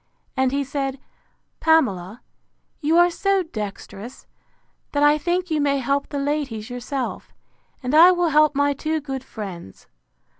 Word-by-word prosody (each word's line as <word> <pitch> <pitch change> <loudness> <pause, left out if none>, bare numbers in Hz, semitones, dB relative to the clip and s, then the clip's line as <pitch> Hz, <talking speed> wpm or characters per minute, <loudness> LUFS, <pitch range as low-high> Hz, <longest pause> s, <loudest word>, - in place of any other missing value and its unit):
And 260 -1 +2
he 280 +1 0
said, 275 0 -3 0.6
Pamela, 225 - +1 0.6
you 320 +2 +2
are 350 0 +5
so 390 +2 +1
dexterous, 215 - -8 0.7
that 290 0 +2
I 295 +1 +5
think 355 +2 -1
you 305 -1 +1
may 280 -1 +2
help 275 +2 -1
the 285 - -4
ladies 275 -6 -2
yourself; 245 +2 -5 0.5
and 250 +2 -2
I 330 +4 +9
will 355 -2 +2
help 305 -1 +4
my 285 0 +2
two 310 +3 -2
good 270 -3 -5
friends. 190 - -9
285 Hz, 145 wpm, -22 LUFS, 250-315 Hz, 0.7 s, I